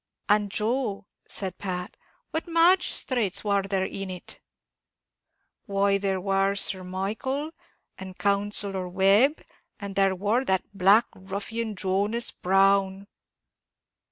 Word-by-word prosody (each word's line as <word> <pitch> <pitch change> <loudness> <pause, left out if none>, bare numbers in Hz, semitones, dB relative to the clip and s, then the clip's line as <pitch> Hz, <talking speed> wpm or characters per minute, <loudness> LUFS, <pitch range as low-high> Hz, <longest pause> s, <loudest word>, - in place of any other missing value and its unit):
"And 210 0 +2
Joe," 215 -1 -2 0.2
said 190 -3 -5
Pat, 180 -2 -5 0.4
"what 320 +2 -3
magisthrates 330 - +2
war 200 -1 +1
there 195 -1 -1
in 195 0 -5
it?" 180 -1 -7 1.3
"Why, 200 0 +1
there 195 -1 -1
war 195 +1 +1
Sir 190 -1 0
Michael, 220 +11 -3 0.5
and 190 -1 -9
Counsellor 200 -2 0
Webb, 195 - +3 0.4
and 200 -1 -7
there 195 -1 +2
war 210 +7 0
that 190 -3 -1
black 200 +5 +5
ruffian 205 +4 -5
Jonas 200 +5 0
Brown." 195 +1 +2
200 Hz, 110 wpm, -26 LUFS, 190-215 Hz, 1.3 s, black